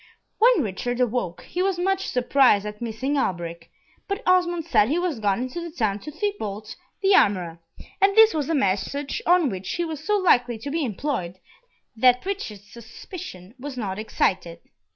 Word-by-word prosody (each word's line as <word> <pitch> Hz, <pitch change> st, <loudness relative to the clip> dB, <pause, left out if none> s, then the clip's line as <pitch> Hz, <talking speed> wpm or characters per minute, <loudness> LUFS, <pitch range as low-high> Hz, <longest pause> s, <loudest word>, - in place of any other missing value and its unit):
When 455 Hz, -, +5 dB
Richard 240 Hz, +4 st, -3 dB
awoke, 245 Hz, -8 st, -1 dB
he 360 Hz, -, -4 dB
was 380 Hz, -1 st, +1 dB
much 385 Hz, +2 st, 0 dB
surprised 250 Hz, -4 st, +3 dB
at 210 Hz, +1 st, -7 dB
missing 255 Hz, +5 st, -2 dB
Alberic, 170 Hz, -5 st, -3 dB, 0.4 s
but 400 Hz, +4 st, -3 dB
Osmond 350 Hz, -2 st, +2 dB
said 225 Hz, -9 st, +3 dB
he 310 Hz, -, +1 dB
was 350 Hz, -8 st, -1 dB
gone 200 Hz, -1 st, +1 dB
into 255 Hz, +7 st, -4 dB
the 340 Hz, -, -6 dB
town 215 Hz, -, -1 dB
to 300 Hz, -, -8 dB
Thibault 225 Hz, -, -4 dB, 0.3 s
the 390 Hz, +1 st, +5 dB
armourer, 180 Hz, -, +2 dB, 0.4 s
and 395 Hz, 0 st, +4 dB
this 445 Hz, 0 st, +8 dB
was 300 Hz, -2 st, -2 dB
a 325 Hz, -, +1 dB
message 275 Hz, +5 st, -1 dB
on 345 Hz, -6 st, +4 dB
which 190 Hz, -1 st, -6 dB
he 345 Hz, -, -1 dB
was 310 Hz, -2 st, -6 dB
so 420 Hz, +3 st, +2 dB
likely 245 Hz, -, +3 dB
to 265 Hz, +6 st, -6 dB
be 325 Hz, +1 st, -1 dB
employed 215 Hz, -7 st, -3 dB, 0.6 s
that 250 Hz, +4 st, +4 dB
Richard's 225 Hz, -, -5 dB
suspicion 225 Hz, -, -10 dB
was 275 Hz, 0 st, -7 dB
not 200 Hz, -4 st, -3 dB
excited. 185 Hz, -5 st, -1 dB
255 Hz, 175 wpm, -24 LUFS, 205-345 Hz, 0.6 s, this